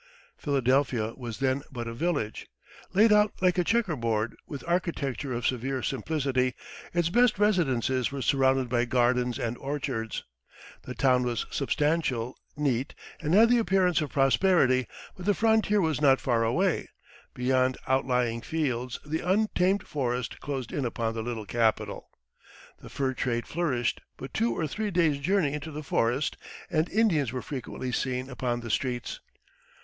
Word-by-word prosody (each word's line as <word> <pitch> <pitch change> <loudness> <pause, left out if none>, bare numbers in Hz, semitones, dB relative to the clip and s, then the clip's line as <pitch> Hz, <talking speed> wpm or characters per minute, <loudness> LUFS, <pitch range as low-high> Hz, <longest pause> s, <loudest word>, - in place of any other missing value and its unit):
Philadelphia 130 -4 +1
was 120 -4 -6
then 135 +1 0
but 120 -3 -5
a 115 - -4
village. 140 -5 -2 0.5
Laid 215 +2 +6
out 210 0 +4
like 185 0 +2
a - - +3
checker 210 -4 +1
board, 115 -3 -1
with 140 -3 -7
architecture 150 -7 -1
of 120 -1 -3
severe 130 0 -1
simplicity, 135 -3 0 0.4
its 170 -1 +1
best 240 +2 +4
residences 135 - +1
were 140 -2 -4
surrounded 135 -1 +2
by 120 0 +1
gardens 125 -1 +1
and 115 +1 -2
orchards. 135 -5 -3 0.6
The 125 - -5
town 130 -2 +3
was 120 -1 -1
substantial, 140 -4 0 0.2
neat, 135 -3 -1 0.2
and 160 +2 +1
had 225 +3 +7
the 245 0 +5
appearance 185 -4 +2
of 150 - -2
prosperity; 135 -2 +3 0.3
but 185 +1 -8
the 205 - +4
frontier 220 -2 +3
was 160 -5 0
not 135 -2 +5
far 120 -3 +1
away 165 +10 +1 0.5
beyond 130 +1 +1
outlying 125 -3 +1
fields 125 -5 -2
the 155 +2 -2
untamed 190 0 +1
forest 125 -4 -2
closed 135 -4 -4
in 140 - -1
upon 115 -2 -2
the 115 - -3
little 110 -2 -4
capital. 115 0 0 0.7
The - - -11
fur 135 -1 -1
trade 120 -2 -1
flourished 145 -9 -1 0.2
but - - -8
two 115 0 0
or 160 - 0
three 210 +8 -3
days' 165 -6 +2
journey 165 -2 +1
into 150 +1 -5
the 150 0 -6
forest, 125 +1 0 0.3
and 160 +1 +1
Indians 180 - +2
were 130 0 -4
frequently 130 -2 -5
seen 130 +1 -2
upon 120 -1 -2
the 115 -1 -5
streets. 125 +1 -2
135 Hz, 155 wpm, -28 LUFS, 125-165 Hz, 0.7 s, had